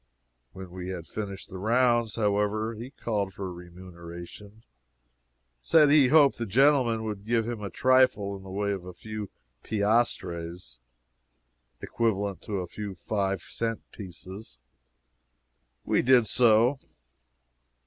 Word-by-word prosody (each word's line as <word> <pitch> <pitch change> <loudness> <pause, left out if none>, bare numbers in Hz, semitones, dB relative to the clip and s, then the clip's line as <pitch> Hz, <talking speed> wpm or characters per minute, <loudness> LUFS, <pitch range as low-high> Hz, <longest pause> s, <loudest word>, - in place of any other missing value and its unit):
When 95 -2 -9
we 90 0 -6
had 90 -3 -5
finished 100 +1 -6
the 95 -2 -8
rounds, 120 +1 +2
however, 105 +1 0
he 115 +3 -8
called 105 - -3
for 95 -2 -5
remuneration 85 +4 -11 1.0
said 150 - +5
he 145 -3 +6
hoped 145 -1 +5
the 115 - -2
gentlemen 125 -1 +3
would 105 -3 -5
give 115 0 0
him 120 -3 -4
a 100 - -4
trifle 130 -2 +3
in 95 - -10
the 95 - -11
way 100 +2 -1
of 95 -3 -4
a 90 0 -9
few 110 -1 -7 0.3
piastres 90 - -1 1.0
(equivalent 100 -5 -1
to 100 -3 -3
a 90 - -6
few 100 +1 -7
five 95 -1 -2
cent 115 -1 -4
pieces.) 95 - -11 1.3
We - - +2
did 125 -2 +5
so. 120 +4 +4
105 Hz, 130 wpm, -27 LUFS, 95-115 Hz, 1.3 s, he